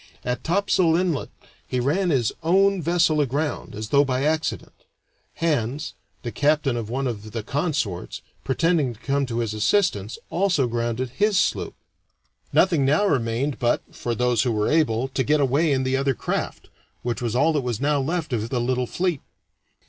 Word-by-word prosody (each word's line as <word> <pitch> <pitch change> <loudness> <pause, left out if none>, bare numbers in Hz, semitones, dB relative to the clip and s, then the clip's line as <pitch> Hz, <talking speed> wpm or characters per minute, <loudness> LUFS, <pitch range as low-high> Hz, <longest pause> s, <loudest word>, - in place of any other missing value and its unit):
At 125 -1 -2
Topsail 180 -2 +2
Inlet 175 -4 0 0.4
he 125 - -1
ran 160 +9 +1
his 125 -8 +2
own 195 +3 +3
vessel 165 -2 +2
aground, 145 -2 -2
as 110 +1 -5
though 140 0 +5
by 130 -1 -1
accident. 155 +1 -1 0.6
Hands, 150 -2 -1 0.3
the 120 - -4
captain 145 -2 +1
of 115 -2 -4
one 135 +3 -2
of 110 -4 -5
the 115 - -3
consorts, 140 - -2 0.2
pretending 150 -2 +1
to - - -21
come 140 0 0
to 115 -1 -3
his 110 -2 -2
assistance, 110 - +1
also 180 -7 +2
grounded 120 +1 -2
his 205 +9 +1
sloop. - - 0 0.8
Nothing 170 -7 +3
now 150 +9 +3
remained 130 - 0
but 120 -1 +1
for 120 -1 -3
those 125 -1 +2
who 120 - +1
were 105 -1 0
able 135 -6 +2
to 130 0 -1
get 150 +2 +2
away 145 +4 +2
in 130 -1 +1
the 130 0 0
other 135 -1 +1
craft, - - -4 0.3
which 120 0 -2
was 120 -1 -2
all 160 +6 +3
that 150 - +1
was 120 -4 -3
now 145 0 +1
left 160 0 -2
of 110 -1 -1
the 125 - -1
little 125 +1 0
fleet. 175 -2 -1
135 Hz, 175 wpm, -24 LUFS, 120-160 Hz, 0.8 s, though